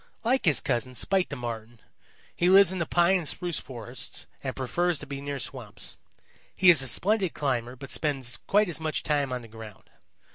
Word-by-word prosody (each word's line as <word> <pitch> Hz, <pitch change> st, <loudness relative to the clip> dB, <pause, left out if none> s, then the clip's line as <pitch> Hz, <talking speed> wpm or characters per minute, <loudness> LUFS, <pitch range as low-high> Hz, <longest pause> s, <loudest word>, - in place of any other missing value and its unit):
Like 250 Hz, +2 st, +2 dB
his 155 Hz, -5 st, +4 dB
cousin, 125 Hz, +2 st, -1 dB
Spite 190 Hz, +6 st, +1 dB
the 140 Hz, -, -4 dB
Marten, 120 Hz, -2 st, -6 dB, 0.6 s
he 175 Hz, -, +2 dB
lives 190 Hz, -1 st, +7 dB
in 185 Hz, -, -3 dB
the 170 Hz, -, -1 dB
pine 175 Hz, +2 st, +4 dB
and 165 Hz, -, -4 dB
spruce 175 Hz, 0 st, 0 dB
forests 120 Hz, -1 st, -6 dB, 0.2 s
and 130 Hz, -1 st, -3 dB
prefers 170 Hz, +7 st, 0 dB
to 150 Hz, -, -9 dB
be 140 Hz, -1 st, -6 dB
near 140 Hz, 0 st, -4 dB
swamps. 130 Hz, -, -4 dB, 0.6 s
He 185 Hz, -2 st, +7 dB
is 160 Hz, -6 st, +3 dB
a 135 Hz, -, -3 dB
splendid 190 Hz, -, +1 dB
climber 125 Hz, -4 st, -1 dB
but 135 Hz, +1 st, -10 dB
spends 135 Hz, -5 st, -1 dB
quite 210 Hz, +1 st, +4 dB
as 170 Hz, -3 st, -3 dB
much 160 Hz, -1 st, -2 dB
time 145 Hz, -3 st, 0 dB
on 125 Hz, -1 st, -3 dB
the -, -, -11 dB
ground. 110 Hz, -2 st, -12 dB
145 Hz, 195 wpm, -27 LUFS, 125-175 Hz, 0.6 s, lives